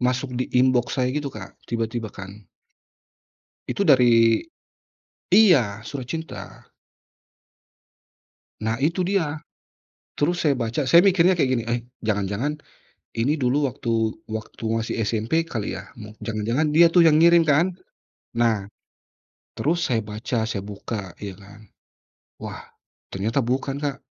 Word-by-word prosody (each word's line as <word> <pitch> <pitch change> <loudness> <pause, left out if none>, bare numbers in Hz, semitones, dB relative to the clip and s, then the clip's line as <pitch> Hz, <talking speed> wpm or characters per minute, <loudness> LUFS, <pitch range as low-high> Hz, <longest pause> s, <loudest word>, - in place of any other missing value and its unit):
masuk 125 +1 -1
di 125 +1 -2
inbox 125 -1 +2
saya 130 -1 +1
gitu 145 0 -2
Kak, - - -11
tiba-tiba 115 -1 -2
kan. 100 +1 -10 1.3
Itu 200 - -1
dari 120 -7 +5 0.9
iya, 125 - +4
surat 130 -2 -6
cinta. 160 -12 -7 2.0
Nah 110 0 0
itu 170 +5 +1
dia. 165 -6 0 0.8
Terus 170 +5 +2
saya 150 - +4
baca 115 +5 -1
saya 135 +6 +6
mikirnya 180 -1 +4
kayak 135 -6 +2
gini, 115 - -2
"Eh, 120 +1 -1 0.2
jangan-jangan 105 +8 -1 0.6
ini 130 +6 +2
dulu 135 +3 +1
waktu 120 +1 -4 0.4
waktu 110 +1 -7
masih 115 0 -2
SMP 115 +10 0
kali 110 -9 -4
ya?" 95 - -12
Mu 105 -2 -10
jangan-jangan 115 +7 -1
dia 170 +1 +7
tuh 170 -1 +6
yang 155 - +5
ngirim 170 0 +6
kan, 150 +3 +4 0.7
nah 115 -4 +2 0.9
terus 165 +3 0
saya 115 -3 0
baca 110 +3 -3
saya 100 -3 -3
buka 100 -2 -6
ya 100 -1 -5
kan, 100 +2 -15 0.8
wah - - -7 0.5
ternyata 110 +7 -1
bukan 135 +3 -1
Kak, 140 -2 -1
125 Hz, 130 wpm, -23 LUFS, 110-150 Hz, 2.0 s, dia